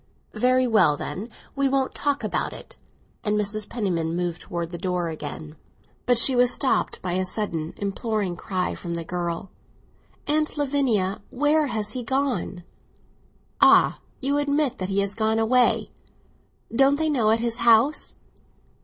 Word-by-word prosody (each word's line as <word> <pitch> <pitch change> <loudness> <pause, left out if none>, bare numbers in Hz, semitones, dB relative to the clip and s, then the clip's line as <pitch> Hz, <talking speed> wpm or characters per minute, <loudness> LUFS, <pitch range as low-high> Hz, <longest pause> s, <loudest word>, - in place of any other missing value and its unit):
"Very 255 +1 +3
well, 215 -11 +3
then; 190 +8 -5 0.3
we 275 -1 +2
won't 270 -1 0
talk 285 -1 -1
about - - -2
it." - - -10 0.5
And 210 -1 +1
Mrs. 210 0 -1
Penniman 175 -8 -2
moved 175 -1 -2
towards 170 -1 -5
the 175 - -6
door 180 -1 -1
again. 150 0 -7 0.5
But 245 -1 +4
she 255 +3 +5
was 245 0 +5
stopped 270 - 0
by 180 -1 -2
a 185 +1 0
sudden 180 -5 -3
imploring 200 -1 -2
cry 185 +1 -2
from 170 -1 -5
the 170 - -4
girl. 175 +2 -4 0.7
"Aunt 305 +1 0
Lavinia, 260 -10 0
where 295 +3 +2
has 215 -4 -2
he 250 - -3
gone?" 255 -7 -2 1.0
"Ah, - - +6 0.2
you 280 +2 0
admit, 290 -2 0
then, 185 - -2
that - - -6
he 200 +1 +2
has 200 0 -1
gone 220 +1 0
away? 245 +3 +2 0.8
Didn't 270 +4 +4
they 315 +2 0
know 250 -8 +2
at 220 - +4
his 235 0 0
house?" 235 +5 +3
220 Hz, 155 wpm, -24 LUFS, 180-260 Hz, 1.0 s, Ah